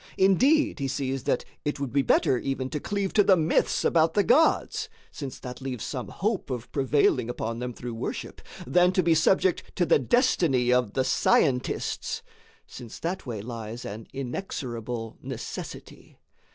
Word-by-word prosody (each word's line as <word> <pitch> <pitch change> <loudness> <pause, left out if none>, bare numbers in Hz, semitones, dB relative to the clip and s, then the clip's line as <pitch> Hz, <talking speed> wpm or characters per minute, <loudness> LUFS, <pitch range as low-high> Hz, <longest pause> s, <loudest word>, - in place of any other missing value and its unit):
[note] - - +2
Indeed 275 - +3
he 135 - -1
sees 135 -1 -3
that - - 0 0.2
it 145 -1 -2
would 140 -3 -4
be 140 - +4
better 130 -1 +3
even 135 -1 -3
to 150 - -2
cleave 200 +3 -2
to 210 - +5
the 190 -1 +5
myths 160 0 +1
about 160 -1 +3
the 205 - +4
gods 300 +9 +3 0.2
(since 140 -3 -7
that 125 +1 -8
leaves 130 -3 -4
some 125 -4 -4
hope 205 -3 -2
of 125 -3 -5
prevailing 135 -3 +2
upon 115 -1 -3
them 125 0 -3
through 120 0 -7
worship) 115 - -5 0.2
than 180 +7 +4
to 185 - +2
be 165 0 +4
subject 180 +3 +2
to 175 - +2
the - - +4
destiny 135 - +2
of 125 -5 +1
the 130 - +1
scientists 130 0 +1 0.4
(since 120 -3 -10
that 170 -3 -4
way 110 -4 -4
lies 115 0 -6
an 105 +2 -7
inexorable 125 - -5
necessity). - - -8
135 Hz, 165 wpm, -26 LUFS, 125-175 Hz, 0.4 s, to